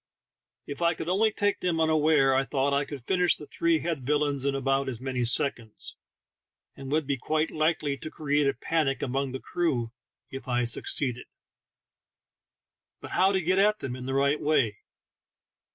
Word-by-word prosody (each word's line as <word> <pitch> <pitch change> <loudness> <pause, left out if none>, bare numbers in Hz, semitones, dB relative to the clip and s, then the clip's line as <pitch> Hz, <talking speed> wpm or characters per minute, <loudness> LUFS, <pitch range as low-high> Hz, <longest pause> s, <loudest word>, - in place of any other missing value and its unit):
If 145 +3 -7
I 170 -1 +3
could 160 - -6
only 215 +4 +3
take 205 -1 0
them 170 -3 0
unawares, 155 -3 +3
I 135 - +3
thought, 140 0 0
I 140 0 +1
could 140 -5 -9
finish 180 -2 +3
the 150 - -10
three 165 +3 +1
head 165 -4 -2
villains 145 0 +1
in 140 -1 +1
about 135 0 0
as 120 -4 -6
many 130 -1 -2
seconds, 115 -2 -1 0.8
and 135 0 -8
would 155 0 +1
be 140 0 -1
quite 155 +4 0
likely 155 -2 0
to 155 - -7
create 145 -2 0
a 140 - +1
panic 145 +1 -1
among 135 +1 -1
the 130 - -5
crew 130 -11 -1 0.4
if 135 0 -8
I 125 -1 +1
succeeded. 125 +1 -1 1.7
But - - -10
how 190 +1 +3
to 190 - +1
get 185 +3 +1
at 210 +2 +4
them 130 -8 -5
in 125 0 -7
the 135 - -2
right 140 +2 +2
way? 130 -9 +1
140 Hz, 175 wpm, -27 LUFS, 135-160 Hz, 1.7 s, at